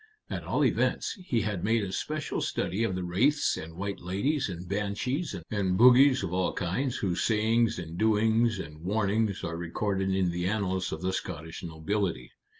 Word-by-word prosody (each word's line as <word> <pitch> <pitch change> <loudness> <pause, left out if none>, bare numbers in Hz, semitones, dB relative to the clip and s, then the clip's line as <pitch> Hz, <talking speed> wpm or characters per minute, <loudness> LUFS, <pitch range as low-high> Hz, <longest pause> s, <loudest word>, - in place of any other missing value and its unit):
At - - -3
all - - +2
events, - - +1
he 115 -3 +1
had 100 -4 -2
made 110 +1 +2
a 95 - -4
special 155 +9 -3
study 100 +6 -1
of 105 -5 0
the 90 - -3
wraiths 125 +13 +2
and 80 +1 -8
white 100 +2 -4
ladies 100 - -1
and 90 0 -6
banshees 105 - -2 0.2
and 95 -3 0
bogies 125 +2 +7
of 90 -2 -3
all 90 0 +1
kinds 120 +9 -1
whose 95 -3 -1
sayings 115 +1 +2
and 85 0 -6
doings 110 +1 +3
and 75 -4 -8
warnings 105 +1 0
are 85 - -3
recorded 95 +3 -1
in 95 -2 +1
the 90 +1 -2
annals 95 -3 -1
of - - -5
the 95 0 0
Scottish 80 -2 -5
nobility. 85 -4 -2
100 Hz, 175 wpm, -28 LUFS, 90-110 Hz, 0.2 s, bogies